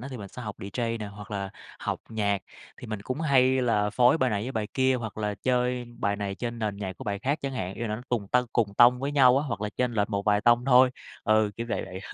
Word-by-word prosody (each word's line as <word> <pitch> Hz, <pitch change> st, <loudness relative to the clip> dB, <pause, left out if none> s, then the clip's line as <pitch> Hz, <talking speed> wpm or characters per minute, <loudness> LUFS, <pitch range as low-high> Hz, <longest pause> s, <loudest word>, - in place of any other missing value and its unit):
á, 130 Hz, -, -7 dB
thì 130 Hz, -, -6 dB
mình 100 Hz, -3 st, -8 dB
sẽ 125 Hz, -, -9 dB
học 105 Hz, -2 st, -6 dB
DJ 115 Hz, +3 st, -3 dB
nè, 105 Hz, -, -5 dB
hoặc 100 Hz, +2 st, -10 dB
là 100 Hz, -1 st, -3 dB, 0.3 s
học -, -, -3 dB
nhạc. 100 Hz, -3 st, -1 dB, 0.3 s
Thì -, -, -10 dB
mình 110 Hz, -2 st, -5 dB
cũng 130 Hz, +7 st, -4 dB
hay 130 Hz, -3 st, +3 dB
là 105 Hz, -3 st, +1 dB
phối 125 Hz, +7 st, +4 dB
bài 130 Hz, -2 st, +2 dB
này 105 Hz, 0 st, -1 dB
với 130 Hz, +3 st, -4 dB
bài 110 Hz, -2 st, -2 dB
kia, 130 Hz, 0 st, +3 dB
hoặc 110 Hz, -3 st, -5 dB
là 105 Hz, -1 st, -1 dB
chơi 125 Hz, +3 st, 0 dB
bài 100 Hz, -1 st, 0 dB
này 100 Hz, -1 st, -3 dB
trên 120 Hz, +2 st, -5 dB
nền 105 Hz, -3 st, -2 dB
nhạc 95 Hz, -3 st, -5 dB
của -, -, -9 dB
bài 100 Hz, -1 st, -2 dB
khác 140 Hz, +7 st, -1 dB
chẳng 135 Hz, -1 st, -2 dB
hạn. 95 Hz, -6 st, -4 dB
Ý -, -, -6 dB
là 115 Hz, -, -2 dB
nó 120 Hz, -, -9 dB
cùng 110 Hz, -5 st, -1 dB
tâng 125 Hz, 0 st, +2 dB
cùng 105 Hz, -4 st, +1 dB
tông 125 Hz, +2 st, +6 dB
với 140 Hz, +2 st, -2 dB
nhau 130 Hz, -2 st, +6 dB
á, 145 Hz, -, -1 dB
hoặc 115 Hz, -5 st, -3 dB
là 105 Hz, -, -2 dB
chênh 125 Hz, -1 st, 0 dB
lệch 105 Hz, 0 st, 0 dB
một 100 Hz, 0 st, -1 dB
vài 105 Hz, -1 st, +3 dB
tông 120 Hz, +1 st, +4 dB
thôi, 125 Hz, -1 st, +6 dB, 0.3 s
ừ, 110 Hz, -1 st, +3 dB
kiểu 115 Hz, 0 st, -4 dB
vậy -, -, -1 dB
vậy. 95 Hz, 0 st, -8 dB
115 Hz, 280 wpm, -27 LUFS, 105-125 Hz, 0.3 s, tông